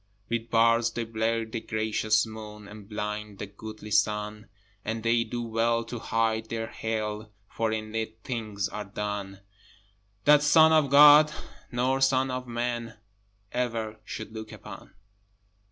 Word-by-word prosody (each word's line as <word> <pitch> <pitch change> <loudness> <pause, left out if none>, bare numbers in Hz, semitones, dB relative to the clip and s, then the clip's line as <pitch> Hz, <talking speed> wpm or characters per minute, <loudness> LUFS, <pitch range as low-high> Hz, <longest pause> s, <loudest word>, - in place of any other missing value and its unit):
With 115 0 -2
bars 115 0 +4
they 115 +1 -3
blur 115 0 -1
the 110 +1 -5
gracious 110 -1 +1
moon, 105 -1 -9
And 105 0 -12
blind 105 -1 -4
the 105 - -5
goodly 105 +1 -10
sun: 105 0 0 0.4
And 110 +1 -3
they 115 0 +3
do 120 0 -4
well 115 +1 +1
to 115 +1 -6
hide 110 0 0
their 115 -1 -2
Hell, 110 -1 -4 0.2
For 115 +1 -1
in 110 0 -4
it 110 0 -3
things 110 -5 -3
are 105 0 -6
done 100 -1 -5 0.8
That 150 0 +7
Son 160 +2 +6
of 155 -3 +4
God 150 +2 +8 0.4
nor 130 +2 +1
son 135 0 +3
of 125 0 -4
Man 120 -1 -3 0.5
Ever 115 -3 -2
should 110 +1 -7
look 110 -1 -7
upon! - - -11
110 Hz, 145 wpm, -27 LUFS, 105-120 Hz, 0.8 s, God